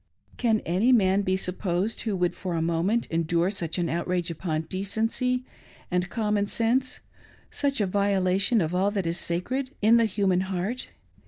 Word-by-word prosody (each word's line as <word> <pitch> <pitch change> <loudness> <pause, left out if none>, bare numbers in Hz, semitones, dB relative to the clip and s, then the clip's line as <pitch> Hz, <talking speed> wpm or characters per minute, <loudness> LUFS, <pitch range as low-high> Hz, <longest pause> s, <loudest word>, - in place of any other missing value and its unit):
Can 225 -3 +2
any 190 +9 +2
man 195 -4 +4
be 190 -1 0
supposed 185 +2 -1
who 215 -3 -1
would 180 -1 +1
for 180 -3 -4
a 165 - 0
moment 170 +8 +1
endure 170 +2 +1
such 170 -5 -2
an 175 -1 0
outrage 175 +1 -1
upon 160 -1 -2
decency 225 +8 -1 0.5
and 180 +1 0
common 210 -3 0
sense 245 +5 0 0.2
— - - -28
such 280 -3 0
a 205 - +2
violation 195 +2 +2
of 160 +1 -1
all 190 +2 +2
that 200 -3 -2
is 165 +2 -1
sacred 255 +11 -2
in 220 +3 +5
the 230 - +4
human 195 -3 +1
heart 190 +6 -3
190 Hz, 170 wpm, -26 LUFS, 175-220 Hz, 0.5 s, in